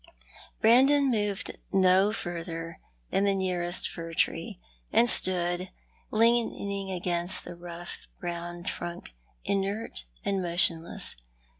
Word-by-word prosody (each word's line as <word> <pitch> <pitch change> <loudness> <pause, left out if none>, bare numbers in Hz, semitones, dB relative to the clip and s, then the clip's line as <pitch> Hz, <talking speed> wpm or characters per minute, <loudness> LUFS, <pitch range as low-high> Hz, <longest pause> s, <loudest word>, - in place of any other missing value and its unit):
Brandon 270 +4 +6
moved 205 -3 -1
no 190 +1 +5
further 165 -4 -5 0.3
than 195 - +2
the 200 -1 +3
nearest 180 -2 0
fir 165 -1 -7
tree, 155 - 0 0.3
and 240 - +5
stood 180 -3 +2 0.4
leaning 215 -4 +1
against 175 -1 -1
the 175 - -8
rough 175 0 -8
brown 175 0 -5
trunk, 175 - -5 0.3
inert 195 - -1 0.2
and 195 -1 +1
motion 170 -1 +2
less. 165 - -7
185 Hz, 110 wpm, -28 LUFS, 175-200 Hz, 0.4 s, Brandon